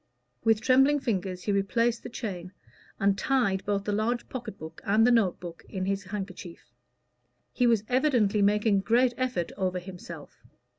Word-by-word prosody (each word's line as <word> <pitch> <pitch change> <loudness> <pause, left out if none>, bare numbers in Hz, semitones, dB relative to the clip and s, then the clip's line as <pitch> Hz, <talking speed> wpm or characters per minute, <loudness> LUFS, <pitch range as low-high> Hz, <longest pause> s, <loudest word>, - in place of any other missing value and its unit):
With 225 -1 +3
trembling 270 +4 +4
fingers 190 -7 -3
he 210 - -1
replaced 230 +4 +1
the - - -8
chain, 185 -6 -6 0.5
and 200 -1 +3
tied 235 -7 +1
both 200 -1 0
the 210 - -2
large 220 +4 -1
pocket 235 -5 -6
book 160 -3 -10
and 215 +3 +3
the 245 - +5
note 220 -7 +2
book 170 -2 -9
in 185 -2 -3
his 195 +1 -2
handkerchief. 190 -3 -8 0.8
He 245 - +2
was 230 -3 +3
evidently 245 -6 +2
making 210 +1 +3
a - - +1
great 240 +4 +3
effort 250 -10 -2
over 185 -1 0
himself. 175 -4 -10
205 Hz, 165 wpm, -27 LUFS, 190-240 Hz, 0.8 s, the